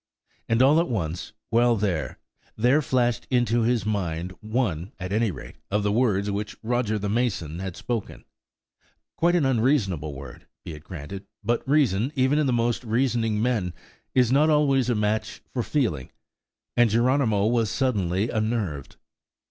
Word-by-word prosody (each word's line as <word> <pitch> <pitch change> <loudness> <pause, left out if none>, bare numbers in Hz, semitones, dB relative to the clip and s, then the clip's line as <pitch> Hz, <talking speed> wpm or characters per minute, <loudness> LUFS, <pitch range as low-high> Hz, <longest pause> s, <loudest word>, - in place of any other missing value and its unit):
And 115 +2 +4
all 145 +4 +5
at 170 - 0
once, 85 -7 -3 0.2
while 120 +1 +4
there, 90 - -2 0.4
there 125 +7 +3
flashed 120 -5 0
into 120 -2 +2
his 115 -2 +1
mind 90 -5 -2
one, 110 -6 -2
at 90 0 -5
any 110 +1 +2
rate, 90 - -9
of 105 +1 0
the 105 - +1
words 105 -3 +1
which 105 +1 -4
Roger 115 -2 0
the 105 0 -3
mason 100 -8 -1
had 95 -2 -5
spoken–quite 125 - -5
an 165 -5 +2
unreasonable 110 - +1
word, 65 -2 -11 0.2
be 85 - -6
it 75 0 -11
granted, 95 +4 -8 0.2
but 115 +2 +1
reason, 130 -5 +2
even 130 +3 +2
in 150 - +2
the - - +2
most 120 0 0
reasoning 115 -2 0
men, 105 -9 0 0.4
is 125 -2 +4
not 150 +4 +4
always 140 -4 +3
a 120 - +2
match 105 +1 -1
for 125 - 0
feeling, 110 - -1 0.7
and 120 -1 +5
Geronimo 115 -2 +2
was 115 -1 +2
suddenly 100 -7 0
unnerved. 110 - -2
115 Hz, 155 wpm, -25 LUFS, 95-125 Hz, 0.7 s, all